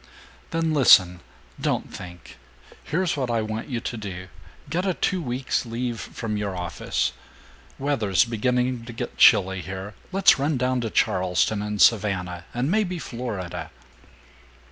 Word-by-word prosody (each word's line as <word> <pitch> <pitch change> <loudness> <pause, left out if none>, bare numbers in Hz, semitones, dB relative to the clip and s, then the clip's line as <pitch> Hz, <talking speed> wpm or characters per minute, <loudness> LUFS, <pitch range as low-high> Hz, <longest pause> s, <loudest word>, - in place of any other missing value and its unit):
"Then 165 -2 0
listen! 90 -11 +6 0.4
Don't - - -1
think! 90 -1 -11 0.4
Here's 180 +3 0
what 130 -4 -2
I 115 -2 +1
want 110 +3 -5
you 120 -3 -2
to 120 - -4
do! 95 -3 -7 0.4
Get 180 +2 -1
a 190 -3 0
two 185 -2 0
weeks 125 -2 -1
leave 120 0 -3
from 110 -2 -4
your 100 -3 -3
office. 90 -1 -2 0.7
Weather's 120 -9 +2
beginning 125 +1 0
to 120 - -8
get 115 - -5
chilly 95 0 +6
here. 95 +3 -7 0.2
Let's 195 -6 +5
run 145 +1 +1
down 125 0 0
to 115 - -2
Charleston 95 0 +1
and 105 0 -3
Savannah 95 -6 +2
and 125 +6 -1
maybe 195 -4 +1
Florida. 115 - -5
115 Hz, 145 wpm, -24 LUFS, 95-130 Hz, 0.7 s, listen